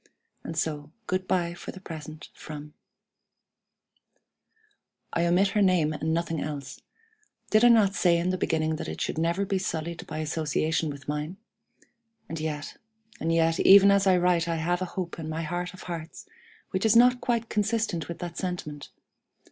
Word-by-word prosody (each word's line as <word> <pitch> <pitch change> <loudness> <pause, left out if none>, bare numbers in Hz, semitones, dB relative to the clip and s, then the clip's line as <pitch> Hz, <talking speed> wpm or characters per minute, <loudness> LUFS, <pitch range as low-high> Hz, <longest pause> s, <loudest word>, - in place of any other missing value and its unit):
"And 165 - -6
so 150 -2 -2
good 185 -1 -2
by 170 -2 0
for 175 - -8
the 190 - -11
present 155 -3 -9
from 150 -1 -9 1.3
"____" - - -45 0.9
I 170 +1 +2
omit 185 +3 +3
her 210 +1 +1
name 180 -5 +3
and 155 +1 -2
nothing 165 -1 -1
else. 145 -3 -6 0.7
Did 215 +1 +5
I - - +9
not 220 -5 +5
say 175 -4 +3
in 175 +2 0
the 185 - -1
beginning 160 -1 0
that - - -5
it 80 +1 -5
should - - -2
never 170 +4 +1
be 195 0 0
sullied 170 -2 -4
by 155 - -5
association 155 0 -1
with 140 -1 -8
mine? 150 +5 -3 0.9
And 165 - -5
yet 155 -2 -4 0.4
and 165 - 0
yet 165 0 +2
even 200 +1 +8
as 200 0 +3
I 185 -1 +5
write 175 -1 +2
I 165 - 0
have 175 +3 -1
a - - 0
hope 175 -2 -3
in 155 -1 -5
my 160 +1 -3
heart 175 +2 -3
of 185 - -12
hearts 165 -2 -7 0.5
which 190 -1 -1
is 220 0 +4
not 245 +1 +6
quite 235 -2 0
consistent 210 -7 0
with 170 - -5
that 175 -1 -6
sentiment. 155 -6 -5
170 Hz, 180 wpm, -27 LUFS, 155-185 Hz, 1.3 s, I